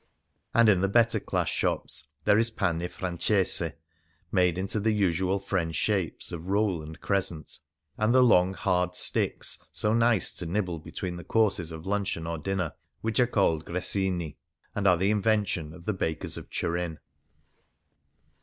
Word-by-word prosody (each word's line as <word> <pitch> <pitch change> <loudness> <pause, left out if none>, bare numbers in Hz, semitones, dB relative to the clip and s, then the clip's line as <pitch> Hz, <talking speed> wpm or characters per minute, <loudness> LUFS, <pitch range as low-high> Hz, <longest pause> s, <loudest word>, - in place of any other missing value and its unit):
And 115 -1 +6
in 95 -4 +5
the 95 - +3
better 115 +1 +3
class - - -1
shops - - -1 0.2
there 105 0 +5
is 115 +1 +3
pane 90 -7 -1
francese, 90 -2 0 0.6
made 90 -3 +3
into 95 +3 -1
the 110 +1 +2
usual 95 -1 +1
French 90 -4 -2
shapes 95 -6 -1
of 85 0 -6
roll 100 -4 +1
and 80 +2 -9
crescent; 90 -7 -2 0.4
and 110 +1 +3
the 130 +1 +6
long, 95 -5 +4
hard 90 -2 0
sticks 90 - -1
so 105 - +1
nice 115 -3 +3
to 90 - -3
nibble 90 -2 -1
between 85 +3 -5
the 85 - -8
courses 95 -5 +1
of 80 0 -8
luncheon 100 -4 -1
or 85 -1 -3
dinner 95 -1 -2 0.3
which 110 +1 0
are 125 - +5
called 85 -9 +2
gressinU 90 -2 -2 0.4
and 100 -1 0
are 90 -2 +5
the 95 +4 +2
invention 105 -7 +1
of 85 +1 -13
the 110 - 0
bakers 80 -4 -2
of - - -7
Turin. 85 -1 -2
95 Hz, 160 wpm, -28 LUFS, 85-105 Hz, 0.6 s, And